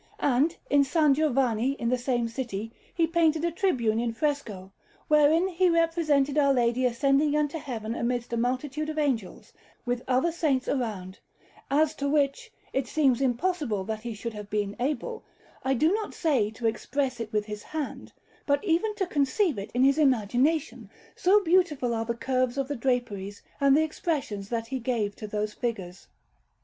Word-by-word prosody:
And 285 +5 +2
in 285 - +3
S. 280 +4 +1 0.2
Giovanni, 265 -4 +1
in 235 -4 -4
the 255 - +2
same 245 -2 0
city, 225 -3 -5 0.2
he 335 - +2
painted 325 -1 +2
a 340 - 0
tribune 250 - +1
in 235 -1 -1
fresco, 230 - -3 0.4
wherein 305 +4 +4
he 365 0 +2
represented 320 -4 +2
Our 280 -1 +4
Lady 245 +1 +2
ascending 275 +4 +2
into 300 +1 0
Heaven 230 -6 -5
amidst 240 0 -2
a - - 0
multitude 260 +5 -2
of 310 - -5
angels, 260 -10 -2 0.3
with 245 0 -1
other 260 +6 +2
saints 295 -6 0
around; 205 -8 -3 0.5
as 300 +2 +2
to 280 0 -1
which, 280 -2 0 0.2
it 265 -1 -1
seems 270 -4 +2
impossible 260 - 0
that 215 +2 -4
he 235 -1 -5
should 230 +2 -5
have 210 -1 -8
been 205 -1 -2
able, 300 - -2 0.4
I 265 0 +1
do 315 +8 +3
not 430 0 -3
say 270 -11 +1
to 225 +2 -8
express 255 +3 -1
it 225 -2 -5
with 210 -2 0
his 210 -1 -6
hand, 305 +2 -6 0.4
but 285 +4 +2
even 415 +4 +1
to 395 -2 -1
conceive 290 - +1
it 200 +2 -6
in 250 - +3
his 275 +3 +4
imagination, 265 +3 +1 0.3
so 400 +3 +4
beautiful 320 -9 +2
are 225 0 -1
the 235 +1 -2
curves 255 +1 -1
of 275 -1 -1
the 290 - -3
draperies 230 -6 -2 0.2
and 275 0 +5
the 315 - +4
expressions 280 - -3
that 230 -1 -2
he 260 +3 -4
gave 225 -4 -1
to 215 - -6
those 210 0 -3
figures. 195 -8 -5
265 Hz, 175 wpm, -27 LUFS, 230-305 Hz, 0.5 s, and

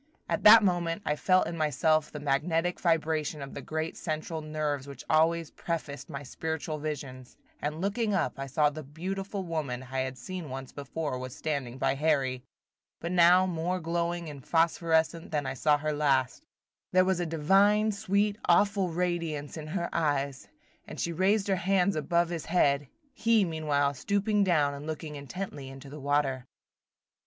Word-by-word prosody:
At - - -1
that 220 +1 +10
moment 175 0 0
I 150 - +1
felt 185 +4 +3
in 165 - -4
myself 155 0 +1
that 150 -1 -7
magnetic 165 +5 0
vibration 160 -2 0
of 140 -1 -7
the - - -6
great 160 +1 -3
central 155 0 -4
nerves 150 -3 -2
which 140 - -9
always 165 +1 +2
prefaced 155 -4 -5
my 140 0 -6
spiritual 160 +2 -4
visions, 135 -4 -6 0.2
and 150 +2 -3
looking 210 +3 0
up 170 -6 -1
I 135 - -4
saw 150 +2 +2
that 155 +1 -7
the - - -11
beautiful 190 +7 -4
woman 150 -7 -3
I 135 - -1
had 130 0 -3
seen 170 +4 -6
once 130 0 -6
before 145 -1 -4
was 130 0 -7
standing 140 -5 -3
by 135 0 +1
Harry, 135 -3 +1 0.6
but 170 - -4
now 180 +1 +6
more 180 +1 -1
glowing 170 0 -2
and 145 -3 -9
phosphorescent 165 0 +1
than 150 -3 -1
I 130 - -2
saw 145 +3 +3
her 155 +1 -2
last; 135 - +1 0.5
there 185 0 +5
was 190 -1 +1
a 175 - 0
divine, 195 +7 +3
sweet, 200 +1 0
awful 195 +1 +3
radiance 165 -4 -2
in 155 -2 -7
her 170 +1 -2
eyes, 140 -4 -1 0.4
as - - -8
she 170 - -1
raised 195 +4 +2
her 195 -1 +2
hands 190 0 +2
above 170 +2 +1
his 170 -3 -4
head, 145 -5 +2 0.3
he, 225 -2 +3
meanwhile, 150 -4 0
stooping 200 - +1
down 150 -6 +2
and 140 +2 -8
looking 155 -1 -5
intently 145 -1 -6
into 135 +1 -11
the 150 - -8
water. 140 -2 0
160 Hz, 170 wpm, -29 LUFS, 145-180 Hz, 0.6 s, that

